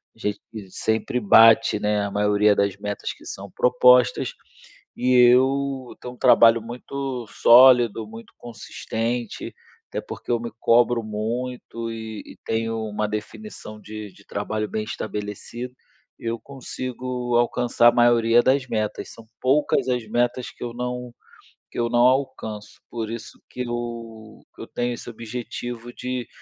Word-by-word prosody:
A - - -24
gente 105 0 -3 0.3
sempre 110 +5 -1
bate, 110 -1 +6
né, 105 0 +1
a 100 - -3
maioria 105 0 +3
das 100 -1 +1
metas 105 0 -4
que - - -18
são 100 0 -8
propostas 125 +2 +4 0.6
e 125 +1 +1
eu 130 +1 +3
tenho 125 - -7
um - - -23
trabalho 115 0 +6
muito 125 +2 -5
sólido, 120 -2 +6
muito 115 +1 -12
consistente, 115 +1 -4 0.4
até - - -3
porque - - -10
eu 120 - +2
me 115 0 -6
cobro 120 +1 +3
muito 115 +2 -4
e 110 -1 -7
e - - -13
tenho 115 0 -1
uma 105 0 -2
definição 105 - -7
de 105 -2 -8
de 100 - -19
trabalho 105 +1 -3
bem 110 - -2
estabelecida, 110 +3 -6 0.5
eu 115 0 -3
consigo 125 -2 -5
alcançar 120 0 +3
a - - +3
maioria 120 -1 +4
das 130 0 +2
metas. 110 -2 -3
São 115 - -14 0.2
poucas 135 +1 +2
as 125 -3 -1
metas 120 +2 -1
que - - -11
eu 120 -1 -5
não 125 0 -4 0.6
que - - -10
eu 120 - +1
não 120 0 +3
alcanço. 120 -5 -2
Por 115 -2 -4
isso 115 - -8
que 125 - -6
eu 115 -2 -6
que - - -11
eu - - -8
tenho 120 0 -2
esse 120 - -8
objetivo 120 +1 -6
de 125 -2 -4
115 Hz, 150 wpm, -23 LUFS, 110-125 Hz, 0.6 s, bate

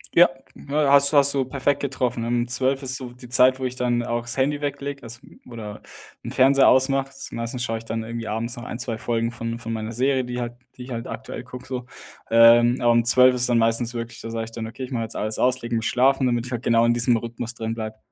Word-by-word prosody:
Ja, 175 +1 +7 0.4
has 140 -1 +4
hast 140 -1 +4
du 135 -1 +1
perfekt 140 +2 -1
getroffen. 125 -4 -2
Ähm, 120 0 0
12 130 +3 0
ist 130 +1 -1
so 125 -3 -8
die 125 -1 -14
Zeit, 130 +2 +4
wo 130 - -3
ich 125 0 -3
dann 120 -1 0
auch 120 0 -2
das 120 +2 -6
Handy 145 +2 0
weglege, 140 0 -4
also 115 0 -9 0.3
oder 110 -3 -8 0.4
'n - - -5
Fernseher 135 +1 +5
ausmache. 135 +1 +3 0.2
Meistens 115 +1 -4
schaue 115 -2 -2
ich 115 - -14
dann 115 0 -3
irgendwie 115 0 -6
abends 115 +3 -3
noch 120 - -9
ein, 120 - -6
2 120 -3 -4
Folgen 115 0 -1
von 115 0 -5
von 115 -1 -6
meiner 110 0 -4
Serie, 130 +2 +1
die 125 0 -5
halt 120 -1 -4 0.2
die 125 - -8
ich 125 - -10
halt 115 0 -5
aktuell 130 -1 -7
gucke 125 0 -10
so. 125 -2 -5 0.4
Ähm, 120 +2 +6
um 120 -1 +4
12 125 +2 +6
ist 125 0 0
dann 120 - +3
meistens 115 +1 +1
wirklich 115 0 -6
da 115 - -7
sage 115 0 -3
ich 115 - -12
dann: 115 -1 -5
„Okay, 125 +3 -8
ich 130 - -7
mach 120 - -2
jetzt 115 0 -5
alles 110 +1 -2
aus 125 0 +3
und 130 - -15
leg 120 - -6
mich 115 0 0
schlafen“, 135 +1 +3
damit 120 -1 0
ich 125 - -8
halt 120 -2 -3
genau 115 -1 +3
in 120 - +3
diesem 120 0 +3
Rhythmus 120 +1 -6
drin 115 -1 -3
bleibe. 110 -1 -6
120 Hz, 250 wpm, -23 LUFS, 115-130 Hz, 0.4 s, Ja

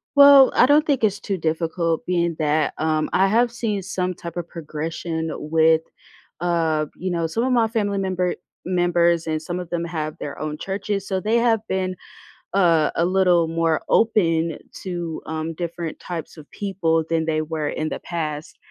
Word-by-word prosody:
Well, 280 -1 +9
I - - +6
don't 295 +3 +4
think 280 -6 +1
it's 205 -2 +2
too 200 -1 -3
difficult 165 0 -1
being 170 -2 0
that, 150 0 +1
um, 155 -1 0
I 190 +1 +3
have 235 +4 +3
seen 215 -5 -2
some 185 0 -2
type 170 -1 -8
of 170 -1 -4
progression 160 +1 -4
with, 160 +1 +3 0.6
uh, 165 -3 +1
you 185 +1 -3
know, 170 -1 0
some 225 +9 -1
of 260 - +1
my 235 -2 +3
family 205 -3 -1
member 185 -2 -1 0.3
members 175 -2 +2
and 155 -1 -1
some 175 +3 -4
of 180 -2 -7
them 170 0 -2
have 155 -2 -4
their 145 -1 -6
own 155 0 -4
churches, 195 +2 -3
so 190 -1 -1
they 215 +4 0
have 230 -1 +3
been 185 -1 -1 0.6
a 170 -5 +3
a 170 - +2
little 180 -2 +3
more 165 -1 +1
open 165 -8 +2 0.3
to, 175 -3 -4
um, 160 +1 -4
different 170 -1 -5
types 170 -3 -6
of 150 -1 -13
people 170 -5 0
than 165 -1 +1
they 155 -1 0
were 155 -1 -3
in 155 0 -2
the - - -4
past, 155 -3 -5
170 Hz, 180 wpm, -22 LUFS, 160-190 Hz, 0.6 s, Well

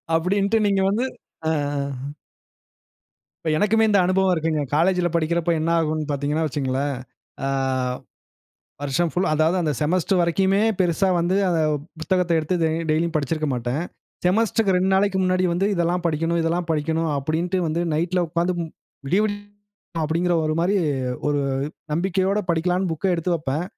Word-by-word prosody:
அப்படின்ட்டு 200 +6 +1
நீங்க 195 -1 +2
வந்து 230 +6 0 0.4
அ. - - +2 1.9
இப்ப 160 - 0
எனக்குமே 215 +4 +3
இந்த 205 -2 +4
அனுபவம் 190 +1 +2
இருக்குங்க. 160 -2 0
காலேஜ்ல 175 +2 +2
படிக்கிறப்ப 170 +1 0
என்ன 160 +1 0
ஆகும்ன்னு 155 -1 -1
பார்த்தீங்கன்னா 145 +3 -1
வச்சுக்கோங்களேன். 135 -1 -1 0.5
அ. - - 0 1.4
வருஷம் 145 +4 0
ஃபுல் 180 - 0
அதாவது 155 +3 +2
அந்த 155 -3 0
செமஸ்டர் 180 +4 +1
வரைக்குமே 190 +3 +2 0.2
பெரிசா 185 +1 +2
வந்து 175 +2 +1
அ - - +2
அந்த 170 -2 +1 0.4
புத்தகத்த 180 +1 0
எடுத்து 160 +3 -1 0.4
டெய்லியும் 165 +2 +1
படிச்சுருக்க 155 +1 -1
மாட்டேன். 125 +5 -2 0.4
செமஸ்டர்க்கு 215 +1 +2
2 185 +1 +2
நாளைக்கு 195 0 +2
முன்னாடி 185 0 +2
வந்து 180 +3 +1
இதெல்லாம் 175 0 0
படிக்கணும், 165 +1 0
இதெல்லாம் 170 +2 0
படிக்கணும் 160 +1 0
அப்படின்ட்டு 165 +6 -1
வந்து 160 +2 -1
நைட்ல 175 +3 +1
உட்கார்ந்து 170 +3 0
மு - - -1 0.4
விடிய 185 +9 +2
விடிய 205 -1 -2 0.7
அப்படிங்கிற 170 +3 +1
ஒரு 155 0 0
மாரி 190 +4 +2 0.5
ஒரு 145 -1 +1 0.5
நம்பிக்கையோடு 190 +4 +1
படிக்கலாம்ன்னு, 180 +2 0
புக்க 180 +3 0
எடுத்து 175 +1 0
வெப்பேன். 150 +1 -2
170 Hz, 140 wpm, -23 LUFS, 155-185 Hz, 1.9 s, இந்த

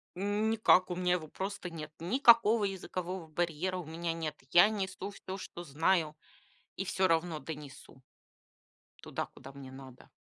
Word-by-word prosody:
Никак. 205 0 +3
У - - -1
меня 180 0 +1
его 165 -3 -2
просто 190 +2 -5
нет. 155 -3 -7
Никакого 230 - +5
языкового 185 -2 -4
барьера 175 +3 -1
у 180 - -5
меня 165 +2 -3
нет! 160 -2 -4 0.2
Я 175 +4 +8
несу 195 -2 -3
всё, 190 -1 -7
что 175 -2 -8
знаю, 160 +1 +1 0.6
и 190 - -2
всё 190 0 +1
равно 165 -1 +1
донесу 145 -4 -9 1.0
туда, - - -4
куда 135 - -13
мне 135 -1 -10
надо. 130 -1 -12
175 Hz, 145 wpm, -32 LUFS, 155-190 Hz, 1.0 s, Я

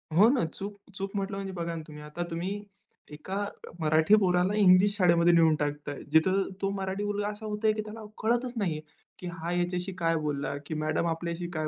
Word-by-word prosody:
हो 205 +5 +7
ना, 260 -6 +2
चूक 200 +5 -6 0.2
चूक 195 0 -4
म्हटलं 195 0 -2
म्हणजे 195 -1 -5
बघा 170 -1 -3
ना, 160 - -4
तुम्ही. 150 -1 -10
आता 150 +4 -5
तुम्ही 185 +5 -3 0.5
एका 170 +6 -6 0.4
मराठी 160 +6 +5
पोराला 180 0 +2
इंग्लिश 200 +1 +6
शाळेमध्ये 170 -2 +5
नेऊन 165 -2 +5
टाकताय, 145 -1 -3
जिथं 185 +5 +3
तो 195 - +1
मराठी 190 +1 -2
मुलगा 205 0 -1
असा 210 +1 -6
होतय, 215 +1 +1
की 215 - -2
त्याला 215 +1 -8 0.2
कळतच 240 +2 +1
नाहीये, 165 -7 -1 0.4
की 180 - -6
हा 170 0 -4
ह्याच्याशी 180 +1 -1
काय 165 0 +2
बोलला 145 -1 -2
की 155 - -5
मॅडम 155 +2 0
आपल्याशी 170 +1 -3
काय 155 -1 -1
180 Hz, 190 wpm, -29 LUFS, 160-205 Hz, 0.5 s, हो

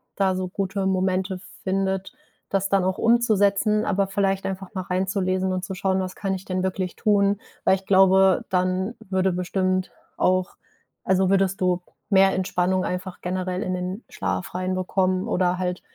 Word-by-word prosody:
da 190 -2 +1
so 185 0 -2
gute 195 +1 -2
Momente 190 0 0 0.2
findet, 190 0 -1 0.4
das 195 0 0
dann 195 -2 +3
auch 190 0 0
umzusetzen, 215 -2 +3
aber 200 -1 +1
vielleicht 195 -1 0
einfach 190 +1 -5
mal 185 - -2
reinzulesen 185 0 0
und 185 0 -2
zu 195 - -5
schauen, 190 0 0
was 185 0 -4
kann 195 -1 -2
ich 185 - -8
denn 185 0 -2
wirklich 185 -1 -2
tun? 200 -2 +2 0.3
Weil - - +5
ich 190 0 -9
glaube, 190 -1 +5
dann 185 +3 0 0.2
würde 190 -1 +1
bestimmt 185 +1 -1 0.2
auch 185 0 +1 0.5
also, 190 0 +2
würdest 195 -1 +2
du 180 -1 +1 0.3
mehr 195 -1 +5
Entspannung 185 0 0
einfach 180 0 -4
generell 185 +1 -2
in 185 -3 -2
den 180 +4 -4
Schlaf - - -3
reinbekommen 185 0 0
oder 180 0 +1
halt, 180 -1 -2
190 Hz, 160 wpm, -24 LUFS, 185-195 Hz, 0.5 s, Weil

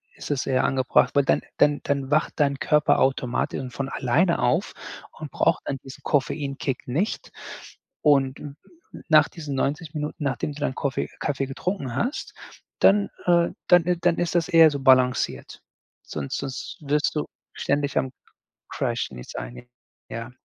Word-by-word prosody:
ist - - -9
es 140 - -1
eher 130 -1 +2
angebracht. 130 -2 +2
Weil 140 - +4
dann - - +2 0.2
dann 145 0 +3
dann 140 -1 -1
wacht 155 +2 +1
dein 140 -2 +1
Körper 150 -1 +3
automatisch 130 -2 0
und 125 -2 -7
von 135 +1 -3
alleine 145 +8 +1
auf - - +1 0.5
und 155 -2 -7
braucht - - +1
dann 135 - -2
diesen 135 -1 -11
Koffeinkick 140 -2 -1
nicht. 165 - -2 0.7
Und 135 -3 +3
n 145 -1 -8 0.4
n - - -10
nach 155 -1 +6
diesen 150 -5 -6
90 145 +4 -2
Minuten, 150 0 -4
nachdem 145 +1 -2
du 150 - -11
dann 130 -3 -1
Koffe 135 0 -2
Kaffee 135 -2 -1
getrunken 135 - -3
hast, 250 - -2 0.5
dann, 200 0 +4 0.2
äh 170 -1 +4 0.2
dann, 175 -2 +6
äh 180 -1 +2
dann 175 -1 +2
ist 175 0 -1
das 165 -2 +1
eher 165 -1 +7
so 140 - -3
balanciert. 130 - +2 0.4
Sonst 70 -2 -4
sonst 135 -2 -6
wirst 145 +1 0
du 150 - -1 0.3
ständig 145 0 -1
am 130 - 0
C - - -62 0.6
Crash - - -2
nichts 60 -1 -10
einnehmen, - - -8 0.4
ja. 115 +2 -6
140 Hz, 165 wpm, -24 LUFS, 130-155 Hz, 0.7 s, eher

